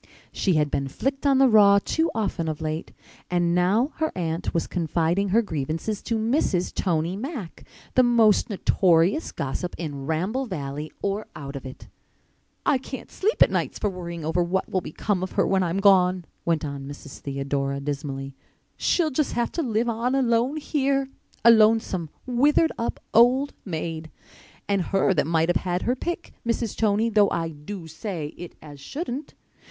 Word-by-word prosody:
She 185 -4 +1
had 150 -2 +1
been 140 - -1
flicked 270 - -2
on 275 -1 +4
the 270 0 +6
raw 205 -3 +7
too 320 +11 0
often 195 -6 -1
of 155 -2 -3
late. 155 0 -4 0.4
And 175 -1 +1
now 200 - +2
her 315 0 0
aunt 165 -1 -2
was 165 - 0
confiding 170 +3 0
her 230 +5 +3
grievances 160 +4 -3
to 230 - -1
Mrs. 220 - 0
Tony 170 0 0
Mack—the 250 - -3
most 235 -4 +4
notorious 185 - +2
gossip 155 +6 -4
in 145 -5 -5
Ramble 195 +12 -1
Valley 150 -4 -5
or 200 +2 -1
out 140 -1 -7
of 135 -1 -6
it! 130 - -11 0.8
"I 270 - +3
can't 265 0 -8
sleep 430 +4 +3
at - - +1
nights - - -1
for 205 - -1
worrying 170 -3 -6
over 165 +3 +1
what 180 +2 0
will 185 - -1
become 185 +4 -2
of 185 - -4
her - - +2
when 195 -1 +2
I'm 175 0 0
gone," 185 -3 +4 0.2
went 165 -3 +1
on 140 -1 -6
Mrs. 140 -1 -10
Theodora 140 0 -2
dismally. 140 -1 -4 0.4
"She'll 325 -4 +1
just 290 +2 0
have 240 0 0
to 335 - -2
live 235 -4 0
on 235 +3 0
alone 250 +2 +2
here—a 275 -5 +1
lonesome, 215 -6 +3 0.2
withered 285 +6 +3
up 230 - -3
old 255 +5 +5
maid. 160 -3 -4 0.6
And 200 -1 +1
her 195 +2 +2
that 155 - +1
might 165 0 +2
have 175 - +3
had 180 0 -2
her 250 - +1
pick, 345 +6 -5
Mrs. 230 -2 -1
Tony, 215 +1 +2
though 210 -2 +4
I 165 -1 -1
do 165 +4 -8
say 160 -1 -5
it 175 -1 -9
as 145 -2 -11
shouldn't. 275 - -5
190 Hz, 170 wpm, -25 LUFS, 160-235 Hz, 0.8 s, raw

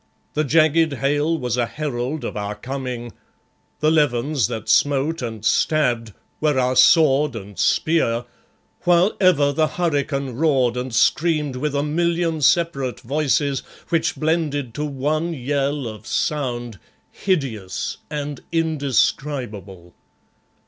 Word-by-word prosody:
The 155 - +1
jagged 155 +1 +3
hail 145 +4 0
was 125 -4 -2
a 120 -1 +1
herald 145 0 -3
of - - -4
our 105 0 -3
coming; 125 -2 -5 0.7
the 155 +1 +3
levens 145 -4 +2
that 115 -3 -6
smote 145 +3 +2
and 110 -3 -5
stabbed 120 -9 +1 0.3
were 150 -3 +1
our 130 0 +1
sword 150 -2 +5
and 100 -2 -8
spear, 120 -8 +1 0.6
while 175 +3 +3
ever 150 -7 +4
the 155 +2 +2
hurricane 145 -4 -1
roared 130 -3 +1
and 125 +1 -4
screamed 150 +3 +2
with 145 +3 -2
a 140 - +1
million 165 +1 0
separate 135 -5 +1
voices 140 +1 0 0.3
which 165 -1 +1
blended 155 -6 -1
to 150 - -3
one 150 +4 -1
yell 140 +1 -1
of 110 -2 -8
sound, 120 - -2 0.3
hideous 125 - -2
and 145 -2 -4
indescribable. 130 - -1
140 Hz, 120 wpm, -21 LUFS, 125-155 Hz, 0.7 s, sword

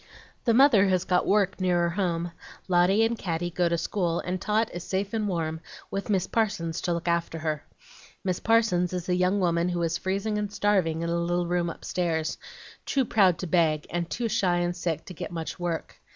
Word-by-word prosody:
"The 230 -3 +4
mother 240 -7 +6
has 185 -2 +2
got 180 -1 +1
work 200 -1 +2
nearer 175 -2 +2
home, 170 -2 -1 0.4
Lotty 185 +4 +4
and 230 +1 0
Caddy 175 -4 -3
go 175 0 +1
to 170 - +1
school, 170 -1 -1
and 180 0 -3
Tot 215 +1 +1
is 175 0 -5
safe 195 +2 -2
and 215 -2 0
warm, 160 -3 -2 0.3
with 195 +2 -4
Miss 190 -3 +2
Parsons 175 -8 -1
to 175 - 0
look 170 +1 -4
after 170 -1 0
her. 155 -2 -2 0.6
Miss 185 -2 -1
Parsons 220 -6 +2
is 180 -1 -3
a 180 - +3
young 180 +2 +2
woman 170 -1 +1
who 175 - -2
was 170 0 0
freezing 200 +3 -1
and 205 -1 -3
starving 185 -6 +1
in 170 - -2
a - - +1
little 175 +1 0
room 175 0 0
upstairs, 165 -2 -2 0.4
too 270 -2 +1
proud 190 -7 +4
to 185 - -4
beg 160 -3 +2
and 175 0 -2
too 235 -1 -2
shy 195 -5 +1
and 175 0 0
sick 170 -3 -3
to 185 - -8
get 160 - -6
much 165 +1 -5
work. 175 -2 -4
180 Hz, 205 wpm, -27 LUFS, 170-195 Hz, 0.6 s, mother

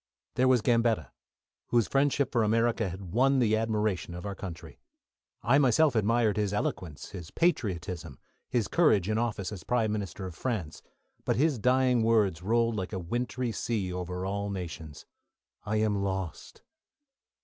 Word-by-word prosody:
There 130 +1 +2
was 125 -4 +4
Gambetta, 115 - +2 0.6
whose 120 -2 +2
friendship 140 -1 +1
for 120 - +2
America 115 -1 +2
had 90 0 -8
won 135 +4 +4
the 110 -4 +3
admiration 110 -5 -1
of 90 - -7
our 100 - -3
country. 85 -4 -9 0.6
I 135 +5 +4
myself 140 +2 +4
admired 110 0 +2
his 105 -2 0
eloquence, 80 -7 -3
his 90 -5 -8
patriotism, 90 - -1 0.3
his 120 -5 0
courage 110 - +3
in 110 +1 +1
office 110 -5 -2
as 100 -4 -7
Prime 115 -3 +1
Minister 100 -2 -4
of 90 - -6
France; 90 -6 -4 0.4
but - - +1
his 145 -2 +2
dying 125 +1 +3
words 105 -7 +2
rolled 115 +3 +1
like 95 +1 -4
a - - -1
wintry 120 +6 -2
sea 105 -5 -2
over 90 0 -4
all 100 +1 -2
nations, 85 -6 -7 0.6
"I 105 +1 -1
am 105 -2 +1
lost!" 95 -3 -4
105 Hz, 155 wpm, -29 LUFS, 95-120 Hz, 0.6 s, was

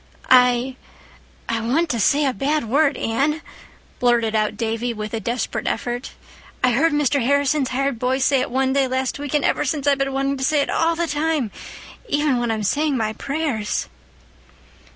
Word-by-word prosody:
"I—I 250 -2 0
want 275 +10 +1
to 235 - -1
say 285 +8 +3
a 265 - +1
bad 285 -1 -1
word, 280 +2 +2
Anne," 280 +8 0 0.6
blurted 235 -3 +2
out 215 -1 0
Davy, 230 +1 -2
with 215 0 -6
a 225 - -1
desperate 235 +4 -3
effort. 240 +2 -3 0.5
"I 250 - +4
heard 300 +8 +3
Mr. 290 -2 +1
Harrison's 280 +1 +2
hired 270 -1 -1
boy 255 +2 +1
say 270 0 +2
it 255 - -2
one 265 +1 +1
day 275 -1 +2
last 260 +1 -2
week, 290 0 -3
and 295 - +2
ever - - +1
since 290 0 -2
I've 280 -1 +3
been 275 0 0
wanting 275 +1 -1
to 265 - -4
say 295 +1 +2
it - - -2
all 330 0 +1
the 340 +1 0
time—even 295 - -2
when 240 -1 -1
I'm 220 -1 -1
saying 290 +6 +1
my 215 -2 -1
prayers." 275 -6 -2
265 Hz, 175 wpm, -21 LUFS, 240-290 Hz, 0.6 s, I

